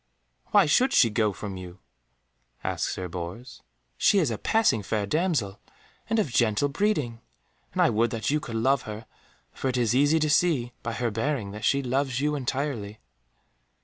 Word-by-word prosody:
"Why 205 -3 +5
should 255 - +3
she 115 -4 +5
go 105 -1 +1
from 100 0 -7
you?" 90 0 -9 0.9
asked - - -1
Sir 90 - -4
Bors. 90 +9 -7 0.4
"She 205 - +4
is 160 -10 +2
a 110 - -4
passing 220 - +2
fair 105 +1 -2
damsel, 130 - -1 0.5
and 225 - +1
of 200 - 0
gentle 115 +4 +2
breeding, 145 - -1 0.5
and - - +2
I - - +4
would 115 +2 +2
that 115 +2 -2
you 150 - +2
could 115 -6 -7
love 130 +4 +2
her, 105 +1 -7 0.5
for - - -3
it 125 - -1
is 120 -2 +2
easy 145 +5 +4
to 155 -1 +1
see 145 -8 +2
by 115 - -4
her 120 0 -1
bearing 115 -2 -2
that 105 +1 -6
she 140 0 +2
loves 130 0 -1
you 150 +1 0
entirely." 130 -6 -3
120 Hz, 180 wpm, -26 LUFS, 110-145 Hz, 0.9 s, Why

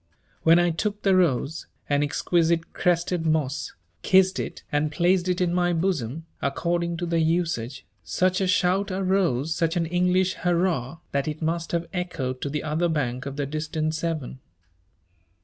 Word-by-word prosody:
When 165 +1 +6
I 175 0 +3
took 205 +5 -3
the 195 -2 +4
rose, 160 -3 +1 0.2
an 145 0 +2
exquisite 165 +2 +1
crested 175 -1 +1
moss, 155 -3 0 0.3
kissed 190 0 +4
it - - -5
and 150 +1 +1
placed 175 +3 +2
it 180 -1 0
in 175 -1 +1
my 175 0 +2
bosom, 160 -5 -1 0.2
according 170 +4 -1
to 175 - -2
the 170 -1 0
usage, 160 -7 -1 0.2
such 185 +1 +1
a 190 - +1
shout 185 +2 +2
arose, 185 -7 +1
such 165 0 0
an 170 - +1
English 180 +2 +2
hurrah, 170 -5 0
that 140 +1 -1
it 155 +1 -4
must 165 +1 -1
have 170 0 -1
echoed 165 -9 -3
to 140 - -2
the 150 +1 -3
other 160 +3 0
bank 130 -4 -2
of 140 - -5
the 145 0 -2
distant 155 +2 -2
Severn. 160 -5 -3
165 Hz, 165 wpm, -25 LUFS, 150-180 Hz, 0.3 s, When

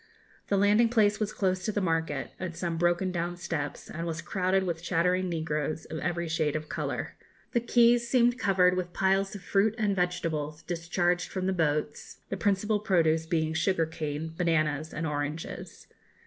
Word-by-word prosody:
The 200 - +2
landing 210 +4 +4
place 210 -3 +3
was 215 -1 -1
close 185 -2 0
to 215 - 0
the 205 - -1
market, 165 -6 -1
at 170 -3 -5
some 170 -2 -2
broken 175 +2 +1
down 175 0 -2
steps, 155 -5 -4
and 170 +1 -5
was 165 -1 -3
crowded 185 +2 0
with 170 -3 -3
chattering 180 +1 +1
negroes, 155 -2 -2
of 160 - -5
every 170 -1 -2
shade 160 -2 0
of 155 0 -4
colour. - - -3 0.4
The 240 - +2
quays 235 0 +4
seemed 245 -1 +3
covered 185 -4 +4
with 180 -1 -3
piles 195 +1 +1
of 200 - -8
fruit 205 +2 +2
and 210 -3 +1
vegetables, 160 -4 -2
discharged 175 +1 0
from 185 -1 -3
the 190 - +1
boats, 150 -3 -1
the - - -2
principal 210 +2 +1
produce 165 -6 +2
being 160 -2 0
sugar 165 0 +1
cane, 160 0 -4
bananas, 155 -3 0
and 165 - -3
oranges. 150 +1 -4
175 Hz, 175 wpm, -28 LUFS, 160-195 Hz, 0.4 s, landing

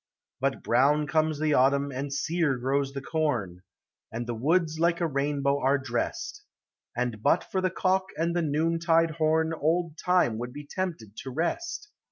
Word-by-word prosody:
But 135 +1 -1
brown 145 +5 +3
comes 155 -1 +1
the 155 0 +1
autumn, 140 +2 +3
and 135 +2 -4
sear 155 -1 0
grows 135 +2 0
the 140 -1 -5
corn. 120 - -1 0.5
And 120 +2 -4
the 120 - -3
woods 160 +6 +1
like 170 +1 +2
a 175 - +1
rainbow 140 -1 0
are 135 +2 +3
dressed, 135 - -3 0.5
And 120 -3 -2
but 165 - +3
for 190 - -2
the 185 - +1
cock 185 +1 +1
and 170 +2 0
the 175 - +2
noontide 165 +2 +2
horn 160 +1 +1
Old 165 +1 0
Time 180 -12 +2
would 125 +1 -5
be 145 +1 -8
tempted 145 - -4
to 135 - -6
rest. 335 - -3
150 Hz, 170 wpm, -27 LUFS, 135-165 Hz, 0.5 s, brown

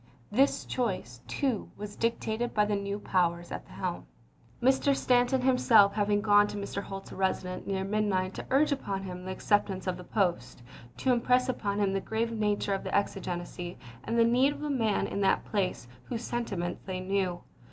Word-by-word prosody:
1 210 - -2
This 275 - +2
choice, 185 - -3
too, 240 - -1
was 205 0 -7
dictated 230 0 -1
by 210 -1 +4
the 210 0 0
new 200 0 -2
powers 175 -3 0
at - - -6
the - - -14
helm - - -4 0.3
— - - -30
Mr. 265 +3 +3
Stanton 250 0 +3
himself 240 -6 +5
hav 205 -1 0
ing 205 0 +3
gone 205 -1 +5
to 205 - -6
Mr. 200 0 -4
Holt's 195 -1 -8
residence 185 -1 -2
near 190 -1 -1
midnight 195 -2 0
to - - -6
urge 295 +3 +3
upon 200 -9 -2
him 180 -1 -7
the 190 - -4
acceptance 195 -1 0
of 185 -1 -1
the 180 - -9
post, 175 - -1 0.3
to 260 - +2
impress 250 +1 +2
upon 205 -5 -1
him 200 -2 +1
the 195 - 0
grave 225 +3 -1
nature 210 -2 0
of 195 - -2
the - - -2
exigency, 175 -3 -3 0.3
and 230 - -1
the 230 - +6
need 255 +4 +4
of 295 - -8
a 300 - -1
man 225 -6 +1
in 200 - -3
that 195 - +2
place 190 - -1 0.2
whose 235 -1 -4
sentiments 195 -9 -3
they 185 -1 -3
knew. 185 -2 -1
205 Hz, 195 wpm, -29 LUFS, 190-235 Hz, 0.3 s, the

